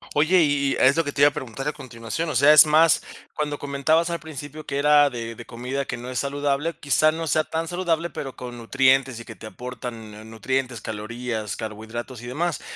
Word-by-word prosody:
Oye, 160 +5 +4
y 140 -2 +1
y - - -2
es 130 +2 +5
lo 165 - +2
que 145 - -3
te 140 - -2
iba 145 - +8
a - - -13
preguntar 130 +2 -6
a 150 - -1
continuación. 130 +3 -5
O - - -3
sea, 140 +4 +7
es 155 - +9
más, 160 +2 +5 0.3
cuando 150 -1 -2
comentabas 150 +5 +1
al 170 - -2
principio 155 -1 -8
que 140 - -3
era 145 0 +5
de 115 -2 -6
de 120 +1 -11
comida 125 +4 -4
que 120 - -4
no 125 +2 -7
es 125 - -2
saludable, 145 +3 -1
quizá 155 +1 +3
no 165 +1 -4
sea 155 +1 +2
tan 165 +1 -3
saludable, 170 -2 -1
pero 135 -2 -6
con 125 -1 -8
nutrientes 130 +1 +2
y 115 - -10
que 110 - -10
te 110 - -10
aportan 120 -2 -8
nu 105 +1 -11
nutrientes, 120 +1 -3
calorías, 110 0 -4
carbohidratos 110 +3 -7
y 120 - -9
demás. 165 +6 -2
140 Hz, 220 wpm, -24 LUFS, 120-150 Hz, 0.3 s, es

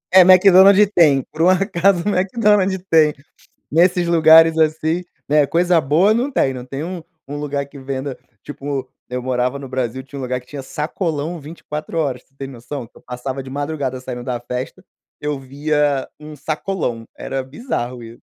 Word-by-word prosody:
É 190 - +10
Mc 185 +2 +7
Donald's 195 +2 +7
tem, 145 -6 +4
por 155 - -5
um 175 - +5
acaso 185 -1 +2
Mc 195 +3 -1
Donalds 205 -3 +3
tem. 155 -2 +4 0.6
Nesses 175 +2 +3
lugares 165 -1 +6
assim, 160 +2 +1 0.2
né, 145 -1 +3
coisa 175 -1 +2
boa 160 +10 +3
não 245 +5 0
tem, 135 - +1
não 125 -1 -7
tem 135 +4 -5
um 180 0 -5 0.3
um 145 +1 -5
lugar 145 -1 -3
que 140 - -14
venda 135 0 -5 0.3
tipo, 140 -2 -5 0.2
eu 125 0 -4
morava 125 +2 -1
no 135 -2 -9
Brasil, 130 -1 -3
tinha 140 +1 -11
um - - -5
lugar 125 0 -2
que 125 - -26
tinha 140 -2 -7
sacolão 155 +2 -3
24 150 +1 -7
horas, 130 -5 -2
você 135 - -39
tem 135 -1 -6
noção? 125 0 -7
Que - - -22
eu - - -17
passava 130 +2 -5
de 130 - -10
madrugada 140 -2 -3
saindo 125 -1 -6
da 125 -2 -3
festa, 125 +9 -6 0.4
eu 150 -1 -2
via 145 +1 -1
um 150 0 -10
sacolão, 150 -4 -3
era 135 0 -4
bizarro, 130 - -5
isso. 115 +1 -12
145 Hz, 185 wpm, -19 LUFS, 130-170 Hz, 0.6 s, É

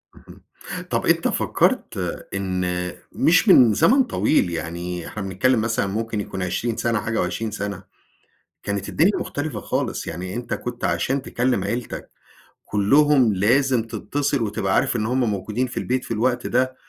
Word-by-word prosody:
اهم، - - -16 0.5
طب - - -1
أنت - - +3
فكرت - - +1 0.4
إن 90 -2 -2 0.2
مش - - +3
من 115 -4 +7
زمن 265 - +4
طويل 155 - +1
يعني، 85 +1 -4
إحنا 105 - -6
بنتكلم 110 +5 +1
مثلًا 110 -3 0
ممكن 110 +1 -2
يكون 95 -1 -5
20 110 +6 -2
سنة، 115 -2 0
حاجة 110 0 -1
و20 110 +5 -2
سنة، 100 -2 -4 0.8
كانت 100 0 -3
الدنيا 190 +6 +3
مختلفة 145 +1 -4
خالص - - -2
يعني، 90 +3 -5
أنت 120 0 -3
كنت 120 -1 -6
عشان 135 0 0
تكلم 125 -7 0
عيلتك 115 +4 -4 0.6
كلهم، 130 +3 +4
لازم 120 +5 +2
تتصل، 140 +5 -1
وتبقى 100 -3 -1
عارف - - +2
إن 110 - 0
هم 125 +3 0
موجودين 105 +5 -2
في 125 - -9
البيت 130 +1 -1
في - - -9
الوقت 120 +3 0
ده، 130 +1 +1
110 Hz, 155 wpm, -22 LUFS, 95-125 Hz, 0.8 s, من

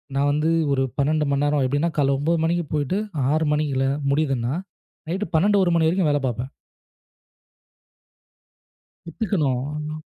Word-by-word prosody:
நான் 140 +1 +2
வந்து 150 +2 +1 0.2
ஒரு 135 -1 +2
12 150 +2 +1
மணி 140 +1 +1
நேரம், 145 -1 +2
எப்படின்னா 145 +6 0
காலையில் 140 -2 +2
9:00 165 +4 +1
மணிக்குப் 170 -1 -1
போயிட்டு, 150 +5 0 0.3
6:00 155 +1 +1
மணியில் 145 -3 0 0.3
முடியுதுன்னா, 135 -4 0 0.6
நைட் 190 +5 -1
12:00, 200 +5 +4
1:00 175 - +2
மணி 160 -1 +3
வரைக்கும் 175 -2 +1
வேலை 145 -1 +1
பார்ப்பேன். 125 +2 -3 2.6
புத்துக்கணும். 150 - -2
150 Hz, 130 wpm, -23 LUFS, 140-165 Hz, 2.6 s, 12:00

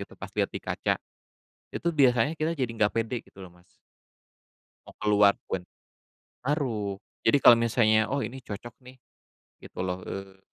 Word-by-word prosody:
gitu - - -9
pas - - -9
liat - - 0
di - - -7
kaca. - - -1 0.7
Itu 170 0 -2
biasanya 130 -2 +4
kita 160 +1 -2
jadi 130 -4 -1
nggak 105 -3 +3
pede 115 +1 -1
gitu 95 - -13
loh, 90 - -13
Mas. 90 - -27 1.2
Mau - - -13
keluar 105 -1 +5
pun. 95 - -3 0.8
Ngaruh. 115 -10 -1 0.3
Jadi, 130 +5 +5
kalau 120 - +9
misalnya, 110 -2 +3
"Oh 140 - 0
ini 130 +2 -8
cocok 115 +1 -8
nih," 125 +1 -14 0.7
gitu - - -13
loh, 90 0 -2
eee, 95 0 -7
115 Hz, 160 wpm, -27 LUFS, 100-130 Hz, 1.2 s, kalau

